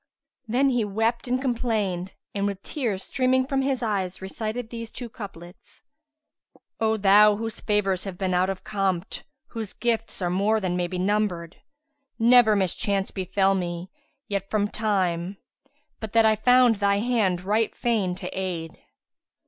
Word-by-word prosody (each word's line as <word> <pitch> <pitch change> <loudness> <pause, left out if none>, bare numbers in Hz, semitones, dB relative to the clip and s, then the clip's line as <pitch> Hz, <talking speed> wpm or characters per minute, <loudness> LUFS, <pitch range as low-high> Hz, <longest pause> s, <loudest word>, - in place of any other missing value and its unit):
Then 260 +5 +2
he 245 -3 +1
wept 225 +4 -1
and 250 +1 +1
complained 220 -8 -1 0.2
and, 200 0 0
with 200 -1 -5
tears 225 -10 -2
streaming 260 0 +1
from 270 0 0
his 265 -2 -1
eyes, 190 -4 -1
recited 220 +4 -5
these 230 -1 -6
two 245 -2 -7
couplets, 190 -5 -11 1.0
"O 220 0 +2
thou 205 +1 +6
whose 225 +1 -5
favours 195 -3 0
have 190 -3 -6
been 185 -1 -1
out 180 +1 +2
of 195 -1 -4
compt, 195 -2 -2
* 270 - -60
Whose 225 -4 -5
gifts 230 -2 -1
are 175 -2 -1
more 205 +4 +2
than 185 -3 -1
may 180 -1 0
be 180 +1 -5
numbered! 185 -3 -1 0.6
Never 235 -2 +6
mischance 195 +1 0
befel 190 +1 +1
me 175 0 -3 0.4
yet 200 -1 -3
from 205 -1 +1
time 190 -4 -1 0.3
* 290 0 -44
But 220 -2 -7
that 225 -1 +5
I 220 0 +5
found 245 0 +5
thy 200 0 +2
hand 205 -6 +1
right 215 +3 0
fain 215 -7 0
to 185 -1 -7
aid." 175 -4 -4
205 Hz, 160 wpm, -25 LUFS, 190-230 Hz, 1.0 s, thou